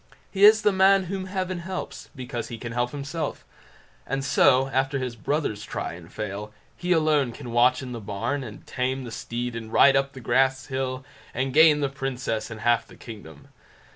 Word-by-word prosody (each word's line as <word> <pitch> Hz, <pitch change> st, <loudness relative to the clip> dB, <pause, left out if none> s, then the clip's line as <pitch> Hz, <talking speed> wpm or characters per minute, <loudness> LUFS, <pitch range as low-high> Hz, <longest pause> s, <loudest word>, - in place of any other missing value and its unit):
He 200 Hz, +1 st, +5 dB
is 215 Hz, +1 st, +7 dB
the 210 Hz, -, +5 dB
man 190 Hz, 0 st, +5 dB
whom 190 Hz, +1 st, -4 dB
Heaven 185 Hz, -1 st, -3 dB
helps, 185 Hz, +2 st, -6 dB
because 125 Hz, -3 st, -5 dB
he 115 Hz, -, -7 dB
can 115 Hz, +1 st, -6 dB
help 120 Hz, +1 st, 0 dB
himself; 145 Hz, +3 st, -5 dB, 0.6 s
and 135 Hz, +1 st, -2 dB
so, 135 Hz, 0 st, +4 dB
after 135 Hz, +1 st, 0 dB
his 125 Hz, -3 st, -3 dB
brothers 115 Hz, -4 st, -2 dB
try -, -, -4 dB
and -, -, -12 dB
fail, 105 Hz, +1 st, -5 dB, 0.2 s
he 180 Hz, 0 st, -3 dB
alone 155 Hz, -6 st, +3 dB
can 120 Hz, 0 st, -9 dB
watch 125 Hz, +3 st, +3 dB
in 125 Hz, -, -7 dB
the 120 Hz, -2 st, -6 dB
barn, 105 Hz, +8 st, -3 dB
and 110 Hz, -4 st, -10 dB
tame 130 Hz, +1 st, -2 dB
the 120 Hz, -, -7 dB
steed, 120 Hz, +1 st, -4 dB
and 110 Hz, -1 st, -7 dB
ride 135 Hz, +3 st, +6 dB
up 135 Hz, 0 st, +1 dB
the 130 Hz, -, -9 dB
glass 130 Hz, +2 st, +2 dB
hill, 130 Hz, -1 st, -3 dB, 0.3 s
and 130 Hz, +1 st, -1 dB
gain 155 Hz, 0 st, +6 dB
the 140 Hz, -, +2 dB
Princess 135 Hz, -5 st, -3 dB
and 110 Hz, -2 st, -8 dB
half 120 Hz, 0 st, +2 dB
the -, -, -15 dB
kingdom. 80 Hz, -10 st, -12 dB
130 Hz, 195 wpm, -25 LUFS, 120-150 Hz, 0.6 s, is